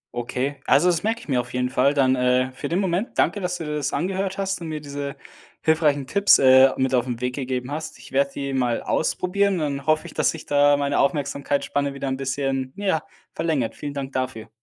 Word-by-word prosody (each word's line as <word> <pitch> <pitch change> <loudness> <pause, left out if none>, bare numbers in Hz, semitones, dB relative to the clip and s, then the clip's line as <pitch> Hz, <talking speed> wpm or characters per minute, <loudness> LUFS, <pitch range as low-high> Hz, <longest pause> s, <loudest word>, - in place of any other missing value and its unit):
Okay, 125 +4 -2
also 150 +7 +5
das 170 -2 +1
merke 225 +2 -1
ich - - -14
mir 130 -4 +1
auf 120 0 -12
jeden 125 0 0
Fall 140 +2 +2
dann, 130 -2 +3
äh, 125 +1 +2
für 130 - -6
den 170 - 0
Moment. 190 +3 -1
Danke, 205 - +2
dass 180 -1 -2
du 165 - -6
dir 150 - -3
das 140 -1 -2
angehört 190 +5 -2
hast 195 -2 -2
und 165 - -5
mir 155 -1 -4
diese 140 -1 -6 0.5
hilfreichen 150 -3 +2
Tipps, 200 +8 +5
äh, 130 0 +7
mit 130 0 0
auf 125 0 +2
'n 120 -1 -3
Weg 125 0 -2
gegeben 130 -1 -3
hast. 155 -1 -5
Ich 125 - -14
werde 140 +1 +2
die 140 -1 -3
mal 125 -3 0
ausprobieren 200 +4 0
und 175 - -2 0.2
dann 140 - -15
hoffe 155 0 +2
ich, - - -9
dass - - +2
sich 160 - -5
da 145 0 +4
meine 140 0 0
Aufmerksamkeitsspanne 140 0 -1
wieder 135 -1 -3
'n 130 - -2
bisschen, 135 -1 -2
ja, 190 -6 0 0.3
verlängert. 145 -9 -1
Vielen 145 -1 -7
Dank 135 -1 -4
dafür. 130 -4 -4
140 Hz, 225 wpm, -23 LUFS, 130-160 Hz, 0.5 s, äh